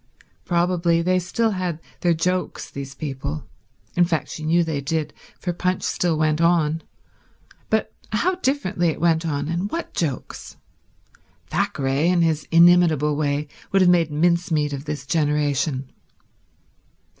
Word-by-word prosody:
Probably 170 -1 +2
they 185 +1 +2
still 220 +6 0
had 180 -4 -2 0.2
their 175 -2 +2
jokes, 180 +3 -2
these 140 0 -7
people—in 135 - -4
fact 160 -4 -1
she - - -7
knew 170 +2 +3
they 155 -4 -2
did, 155 +2 -2 0.3
for 175 - -2
Punch 180 +1 -1
still 170 -3 0
went 155 +1 +1
on; 165 -2 +2 0.9
but 220 0 0 0.2
how 290 - +1
differently 265 - 0
it 160 - -1
went 165 0 +2
on, 145 -1 -2
and 170 +5 -2
what 335 +7 -5
jokes. 145 -7 -4 0.9
Thackeray, 135 +3 0
in 175 -2 +3
his 155 -2 0
inimitable 165 -3 +5
way, 145 0 -1 0.2
would 195 -1 +4
have 180 - +6
made 170 -3 +3
mincemeat 160 -1 +1
of 140 +1 -5
this 150 -3 -5
generation. 145 -2 0
165 Hz, 135 wpm, -22 LUFS, 150-175 Hz, 0.9 s, have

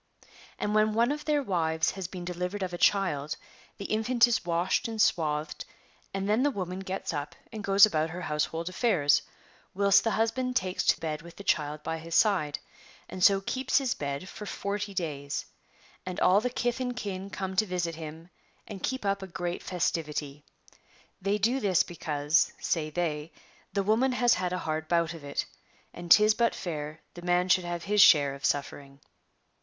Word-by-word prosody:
* - - -22
yVnd 210 - -1
when 215 0 +3
one 235 +4 +3
of 300 +1 -4
their 295 -2 +1
wives 160 -5 0
has 190 -2 -5
been 180 -1 -7
delivered 180 +3 -3
of 180 -1 -4
a - - -3
child, 155 -8 +2 0.4
the 200 - -7
infant 235 +3 +3
is 235 - 0
washed 175 +7 0
and 225 -1 -6
swathed, 155 -7 +1 0.5
and 195 0 -3
then 215 +4 +2
the 290 - +3
woman 185 -7 -4
gets 190 0 -4
u}) 145 - -1 0.3
and 215 -2 -6
goes 195 0 +7
about 160 -6 0
her 175 +2 -6
household 165 +1 -2
affairs, 185 - +2 0.5
whilst 200 0 +5
the 225 - +1
husband 240 +3 0
takes 185 -3 0
to - - +3
bed 155 -1 -3
with 170 0 -13
the 200 - -10
child 150 -4 0
by 160 0 -3
his 165 +1 -5
side, 180 -9 +3 0.5
and 185 - -5
so 195 0 +6
keeps 260 +6 0
his 270 -3 +1
bed 140 +4 -4
for 210 +1 -8
40 205 +1 -3
days; 145 -5 -3 0.6
and 185 -1 -5
all 190 +3 +5
the 250 - -1
kith 245 0 -1
and 250 -1 -2
kin 195 -3 -5
come 190 -1 -4
to 215 - +3
visit 175 -2 -2
him 160 +2 -9 0.4
and 200 -3 -8
keep 260 -5 -2
up 200 0 0
a 190 - -6
great 175 0 -4
festivity. 150 -5 -2 0.8
They 200 +2 +1
do 235 +6 +1
this 195 -7 +3
because, 150 -2 0
say 155 -3 -1
they, 155 -1 -2 0.4
the 200 0 0
woman 230 +6 +2
has 245 -1 +4
had 180 -1 -1
a 180 - -1
hard 155 0 -2
bout 170 0 +1
of 165 -3 -11
it, 140 0 -3 0.5
and 175 0 -9
'tis 210 +4 +7
but 235 +1 +1
fair 155 -3 -5
the 175 - -10
man 180 +1 +1
shoukl 185 0 +4
have 175 -1 -4
his 210 +1 +3
share 145 -7 +7
of 140 0 -11
suffering.' 140 -1 -2
180 Hz, 190 wpm, -28 LUFS, 160-210 Hz, 0.8 s, goes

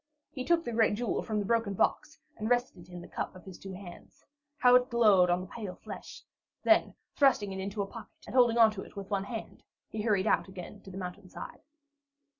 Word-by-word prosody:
He 260 - -4
took 335 +4 +2
the 240 - -2
great 225 -2 +3
jewel 240 +2 -1
from 215 - -3
the 205 - 0
broken 225 -2 +1
box - - 0 0.2
and 215 +1 -3
rested 240 -8 0
it - - -14
in 175 0 -7
the - - -10
cup - - -4
of 185 - -13
his 190 -2 -10
two 195 -1 -8
hands. 180 -2 -12 0.3
How 250 -2 +6
it 250 0 +5
glowed 210 -7 +5
on 175 +1 +2
the - - -6
pale 200 -1 -7
flesh! - - -9 0.4
Then, - - +4 0.2
thrusting 250 -8 +3
it 190 - -5
into 200 +2 -2
a - - -4
pocket 225 +3 -12
and - - -8
holding 240 -2 +5
onto 220 -4 +5
it - - -12
with 200 0 -7
one 195 -1 0
hand, 225 +1 -7 0.3
he 215 - -3
hurried 210 -3 +2
out 215 - +2
again 190 +2 -9
to - - -12
the 190 - -8
mountainside. 185 0 -8
205 Hz, 225 wpm, -30 LUFS, 190-235 Hz, 0.4 s, How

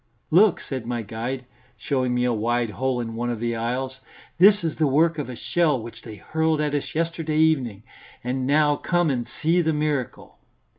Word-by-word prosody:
"Look," 190 +3 +5
said 130 -4 -6
my 120 -1 -2
guide, 120 +4 -5 0.3
showing 130 -3 -1
me 125 - +1
a 125 -1 +2
wide 115 +1 0
hole 130 +2 -1
in 115 -1 -4
one 120 +1 -2
of 120 -2 -3
the 120 0 -1
aisles, 130 +3 -3 0.4
"this 200 +1 +6
is 160 -2 -2
the 155 - +2
work 155 +3 +2
of 145 - -4
a 125 - -6
shell 155 0 +1
which 115 +1 -10
they 110 -2 -9
hurled 160 - 0
at 150 -1 0
us 145 +1 -3
yesterday 165 -1 -1
evening. 135 -10 +2 0.4
And 130 +1 -2
now 145 0 +3
come 175 -3 +1
and 120 -3 -2 0.2
see 170 +3 +4
the 160 -1 +1
miracle." 150 -4 -3
135 Hz, 195 wpm, -24 LUFS, 120-155 Hz, 0.4 s, this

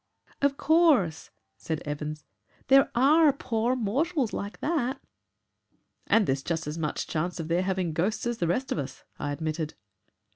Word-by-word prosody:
"Of 280 0 +2
course," 295 - +3 0.3
said 160 -2 -4
Evans, 150 +1 -5 0.4
"there 270 +1 +6
ARE 295 +5 +6
poor 240 -2 -1
mortals 260 - 0
like 200 +1 -5
that." 280 -4 -1 1.1
"And 225 -2 +4
there's 135 -3 0
just 165 +2 -2
as 150 +1 -4
much 150 -2 -2
chance 170 +3 -2
of 160 0 -4
their 170 +2 +2
having 185 -3 -1
ghosts 190 +10 -1
as 240 -1 -2
the 170 - +1
rest 255 +11 -1
of - - 0
us," 135 -2 -6 0.2
I 145 - -2
admitted. 155 +1 -3
195 Hz, 155 wpm, -27 LUFS, -, 1.1 s, there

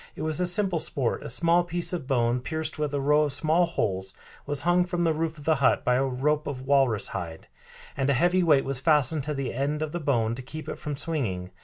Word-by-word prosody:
It - - -6
was 155 +2 0
a 180 - +5
simple 180 -1 +2
sport; 130 -5 -1
a - - -7
small 170 +7 +3
piece 175 +1 -2
of 160 -7 -4
bone, 120 -2 +1
pierced 160 +4 -4
with 150 -2 -1
a 145 - -1
row 150 +2 +3
of 145 - -2
small 160 +4 +2
holes, 95 - -3 0.3
was 145 -1 0
hung 175 +2 +3
from 175 -1 -2
the 165 -1 +2
roof 160 +1 -3
of 145 - -12
the 160 - +4
hut 130 - +2
by 125 - +3
a 130 +2 +2
rope 140 +3 -1
of 130 -2 -5
walrus 135 -7 +2
hide, 80 -2 -6 0.5
and 135 0 -1
a - - +4
heavy 175 +7 +2
weight 150 -6 +3
was 135 -1 -2
fastened 150 0 +2
to 150 0 -3
the 135 -2 -3
end 145 +4 -2
of 155 - -4
the 175 - -3
bone 120 -7 0
to 125 - -6
keep 155 +5 -9
it - - -6
from 145 -2 -5
swinging. 115 - -2
145 Hz, 250 wpm, -26 LUFS, 130-160 Hz, 0.5 s, a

